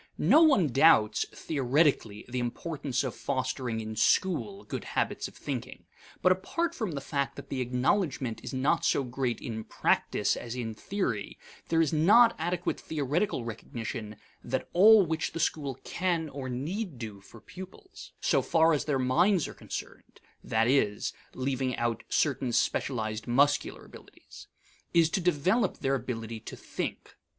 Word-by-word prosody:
No 315 - +5
one 270 - +5
doubts, 120 -6 +4
theoretically, 135 -6 0
the 125 +1 -3
importance 135 +2 -2
of 130 - -3
fostering 130 -3 -2
in 110 0 -6
school 195 - +1
good - - -5
habits - - -2
of - - -15
thinking. - - -6 0.4
But 185 - +6
apart 330 - -1
from 220 - -3
the 140 - -4
fact 140 -2 -2
that - - -10
the 135 -2 -2
acknowledgment 125 - 0
is - - -5
not 140 +5 +1
so 140 - +2
great 125 -1 -2
in 110 -2 -5
practice - - +1
as 120 0 -6
in 115 -3 -4
theory, 125 - -3 0.3
there 165 0 +3
is 160 - -1
not 215 +10 +6
adequate 175 +2 -2
theoretical 150 - -1
recognition 110 -1 -6 0.3
that 130 +2 -2
all 205 +2 +7
which 160 -1 -2
the - - -4
school 145 -4 -1
can 170 -3 -1
or 135 -2 -6
need 155 - -4
do 110 -4 -7
for 115 +4 -15
pupils, 190 - -12
so - - +2
far 165 0 +3
as 150 - 0
their 145 -3 +1
minds 165 +8 +2
are - - -8
concerned - - -8 0.2
(that 110 +1 +1
is, 115 -6 +1 0.2
leaving 130 -1 -1
out 120 -1 -1
certain 135 -4 +1
specialized 110 -2 -1
muscular 140 +4 +2
abilities), - - -14 0.5
is 165 -1 +5
to 195 - 0
develop 180 +6 +1
their 135 - 0
ability 115 -4 -4
to - - -9
think. - - -6
140 Hz, 155 wpm, -29 LUFS, 120-170 Hz, 0.5 s, all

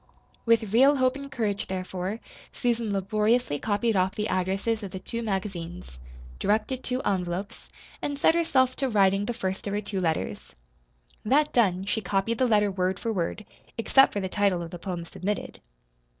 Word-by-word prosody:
With 225 -3 +3
real 270 +5 +6
hope 255 -1 +2
and 280 0 -8
courage, 205 -4 -2
therefore, 185 +2 -4 0.3
Susan 235 -3 -1
laboriously 210 -2 +1
copied 220 +1 0
off 185 0 +1
the 210 0 -2
addresses 195 +5 0
of 200 - -5
the 190 - -6
two 230 +4 -5
magazines, 180 - -4 0.4
directed 220 +5 0
two 255 +1 -2
envelopes, 185 +1 -3 0.3
and 285 -1 -2
set 305 - +4
herself 265 -7 +2
to 270 - 0
writing 195 -2 +3
the 240 - -1
first 190 -4 -3
of 200 - -2
her 205 - 0
two 195 -2 -3
letters. 165 -3 -2 0.7
That 290 +7 +2
done, 190 -6 +2
she 215 +2 -1
copied 200 +3 -1
the 255 - +3
letter, 210 -3 +3
word 185 0 0
for 230 - -2
word 190 +3 -2 0.3
except 270 +4 +5
for 205 - -1
the 190 - -2
title 190 -3 +1
of 165 - -8
the 175 - -7
poem 175 -2 -4
submitted. 200 +5 -4
205 Hz, 175 wpm, -27 LUFS, 190-235 Hz, 0.7 s, real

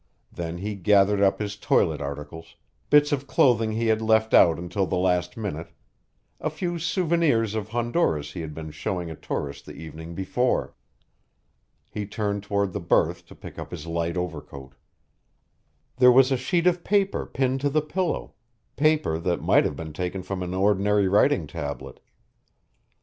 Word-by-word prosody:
Then 85 0 -5
he 105 +4 -4
gathered 100 +1 +3
up 95 -1 +3
his 100 -1 -4
toilet 80 -6 +1
articles, 75 +4 -7 0.3
bits 145 0 +5
of 140 -1 -1
clothing 115 -4 +3
he 115 +1 -1
had 110 -1 +2
left 110 0 +2
out 85 -2 +6
until 90 +2 -2
the 90 - -1
last 90 +1 0
minute, 90 -7 -5 0.7
a - - -1
few 175 +2 -3
souvenirs 165 - +1
of 110 -2 -3
Honduras 120 - 0
he 90 - -6
had 75 -2 -7
been 80 -1 -7
showing 90 +1 -4
a - - -7
tourist 70 -1 -5
the - - -9
evening 80 +1 -9
before. 125 +7 0 1.2
He 105 -1 -4
turned 100 -1 -2
toward 100 -1 -1
the 100 - -2
berth 85 - +1
to - - -14
pick - - -10
up - - -7
his 85 -3 -7
light 85 +1 -2
overcoat. 70 -6 -6 1.2
There 125 -1 +7
was 130 +1 +5
a - - +4
sheet 170 +7 0
of 175 -1 +2
paper 200 -1 +1
pinned 130 0 -1
to 145 - +1
the 155 +1 +1
pillow, 180 +3 -2 0.4
paper 150 - +2
that 85 +1 -1
might - - +4
have 75 - -2
been 80 +1 -7
taken 90 +3 -4
from 95 -1 -4
an 90 0 -4
ordinary 100 +1 +2
writing 100 - +3
tablet. 70 0 -6
100 Hz, 165 wpm, -25 LUFS, 85-125 Hz, 1.2 s, There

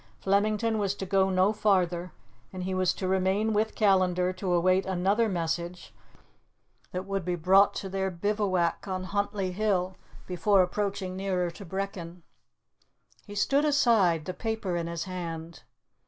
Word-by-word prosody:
Flemington 215 +3 +1
was 200 -1 0
to 195 - -5
go 190 0 +2
no 190 +2 +3
farther, 180 -4 +1 0.4
and 185 -1 -6
he 190 +1 -2
was 185 -1 +2
to 185 - -3
remain 190 +4 +1
with 215 +1 0
Callandar 185 -3 +2
to 185 0 -3
await 185 +2 +3
another 195 +5 +1
message 170 0 -3 1.0
that 185 +1 -4
would 195 -1 -2
be 180 +1 -1
brought 190 +4 +4
to 195 - -4
their 190 0 -1
bivouac 185 -1 -1
on 185 -1 -3
Huntly 200 0 -2
Hill, 190 -2 0 0.3
before 185 +2 +3
approaching 195 0 -3
nearer 185 -2 -1
to 195 +4 -11
Brechin. 180 -2 -5 1.0
He 205 - -8
stood 275 +8 +2
aside, 225 - +3
the 185 - -4
paper 220 -4 -3
in 170 -1 -2
his 170 -1 -3
hand. 170 -3 -6
190 Hz, 150 wpm, -28 LUFS, 180-205 Hz, 1.0 s, brought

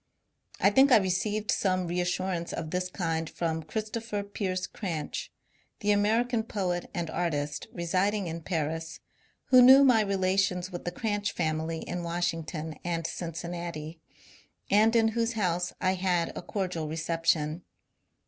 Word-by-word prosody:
I 200 - +5
think 265 +5 +5
I - - +9
re 190 -3 +1
ceived 205 +3 0
some 185 -2 +1
reassurance 175 0 -1
of 160 -1 -4
this 180 0 -1
kind 165 -3 -2
from 160 -1 -2
Christopher 215 +3 -4
Pearse 190 -2 -3
Cranch, 165 -7 -4 0.5
the 210 -1 +2
American 225 +4 +2
poet 185 -5 -2
and 175 -3 -3
artist, 145 -4 -2
residing 185 +4 0
in 165 0 -5
Paris, 160 -1 -3 0.5
who 255 -1 +8
knew 265 +3 +9
my 250 -5 +6
relations 190 -2 +1
with 175 - -7
the 175 - -1
Cranch 205 -1 -2
family 160 0 -1
in 180 - -4
Washington 165 -2 -3
and 170 -2 -2
Cincinnati, 170 -1 -5 0.7
and 215 +3 +5
in 225 -1 +5
whose 230 +1 0
house 180 -4 0
I 185 - +2
had 180 -2 0
a - - -4
cordial 180 -6 -3
reception. 160 0 0
180 Hz, 140 wpm, -28 LUFS, 165-205 Hz, 0.7 s, I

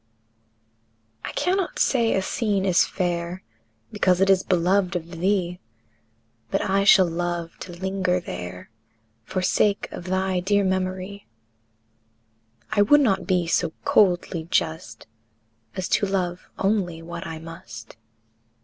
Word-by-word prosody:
I - - -4
cannot 370 0 0
say 235 -4 +2
a 190 - 0
scene 200 -2 0
is 185 -3 +4
fair 175 0 -3 0.5
Because 185 -4 +2
it 195 0 +4
is 190 -1 +4
beloved 185 +1 +1
of 170 0 -5
thee, 180 -1 0 0.9
But - - 0
I 195 +1 +2
shall 190 -2 +7
love 170 0 -3
to 185 - -8
linger 185 0 -1
there, 90 - -8 0.5
For 185 +7 -3
sake 200 +2 +2
of 175 - -8
thy 185 0 0
dear 200 +3 +2
memory; 185 +1 -2 1.4
I 210 -1 +3
would 290 +8 +6
not 195 -8 +1
be 180 -2 +2
so 165 -1 0
coldly 175 -4 +2
just 160 -1 -2 0.7
As 185 - -2
to 200 - +2
love 185 -2 -2
only 190 -5 0
what 170 0 -7
I 160 -1 -6
must. 160 -9 -10
185 Hz, 130 wpm, -24 LUFS, 170-195 Hz, 1.4 s, shall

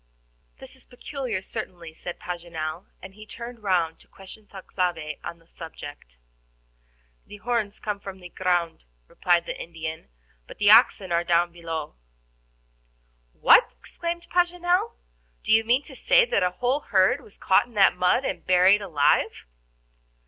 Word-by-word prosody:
"This 265 -1 -13
is 260 - -16
peculiar 245 -5 -5
certainly," 170 -4 -7
said 175 +2 -8
Paganel, 170 -1 -6 0.2
and 190 - -10
he 215 +1 -13
turned 235 0 -9
round 175 -5 0
to - - -22
question 195 +2 -14
Thalcave 175 -5 -4
on 170 - -7
the 165 - -26
subject. 145 - -11 1.1
"The 205 - -11
horns 220 -2 -2
come 210 -1 -3
out 200 - -18
of 190 -1 -7
the 180 -1 -11
ground," 175 -2 -1 0.2
replied 175 -1 +1
the - - -5
Indian, 160 - -7 0.4
"but - - -12
the 205 0 +5
oxen 190 -3 +5
are 170 0 +2
down 175 0 +2
below." 165 - -6 1.4
"What!" - - +5
exclaimed 340 - -5
Paganel; 355 +4 +1 0.5
"do - - -2
you 220 0 +5
mean 245 +5 +2
to 275 - -10
say - - +4
that - - 0
a 180 - +2
whole 250 +9 -1
herd 190 -9 +2
was 205 - -17
caught 190 - +3
in 240 - -20
that 195 -3 +5
mud 180 +9 +2
and - - -3
buried 185 +3 +4
alive?" 155 -7 +1
185 Hz, 155 wpm, -25 LUFS, 170-230 Hz, 1.4 s, the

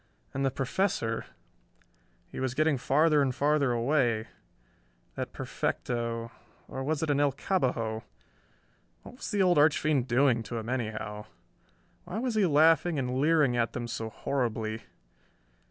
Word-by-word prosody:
And 135 - -1
the 135 - +3
Professor... 130 - -1 1.0
he - - -6
was 130 -1 -2
getting 155 -2 +2
farther 150 +4 +3
and 130 -2 0
farther 145 -2 +2
away... 120 -2 +1 0.8
that - - -5
perfecto... 115 -1 -3 0.4
or 135 - -5
was 155 +2 -1
it 155 - +1
an 145 - +1
El 145 -1 +3
Cabbajo? 125 - -1 1.0
What 250 - -12
was - - -6
the 205 -4 +2
old 180 -4 +4
archfiend 150 -3 +3
doing 120 -1 +3
to 115 +1 -5
him 115 +1 -5
anyhow?... 110 -4 -3 0.8
Why 180 +3 -5
was 245 +1 -1
he 210 -4 +3
laughing 160 +2 +4
and 130 -1 -1
leering 150 -4 +3
at 115 -1 0
them 120 -1 -4
so 110 -1 -4
horribly?... 110 -3 -2
135 Hz, 140 wpm, -29 LUFS, 115-155 Hz, 1.0 s, old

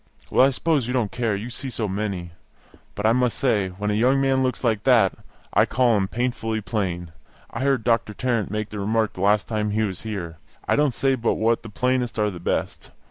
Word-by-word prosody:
Well, - - +5
I - - +2
suppose 140 -1 0
you 125 - -2
don't 120 -6 0
care, 115 -4 -1
you 100 - -5
must 125 - -6
see 135 - -4
so 110 -3 -2
many. 95 -3 -3 0.6
But 105 - -3
I 110 - +5
must 125 0 +1
say, 105 -8 +1
when 105 +3 -3
a - - +1
young 125 +6 +3
man 135 -1 +2
looks 130 0 -1
like 110 -3 +1
that, 115 -7 +4 0.4
I - - +4
call 120 -2 +3
him 95 -2 +1
painfully 115 -1 -2
plain. 90 -5 -3 0.4
I - - -5
heard 135 -3 +1
Doctor 115 -2 +1
Tarrant 120 -4 -1
make 110 +1 -3
the 105 - -6
remark 110 +2 0
the 90 - -7
last 100 +1 +3
time 105 -2 -1
he 110 +1 0
was 95 -4 -3
here. 90 -7 -5 0.3
I - - +3
don't 145 -4 +2
say 135 -1 +2
but 120 -3 0
what 115 +1 +1
the 115 - -9
plainest 125 0 -1
are 105 -1 +1
the 90 - -8
best. 85 - -3
110 Hz, 230 wpm, -23 LUFS, 105-125 Hz, 0.6 s, Well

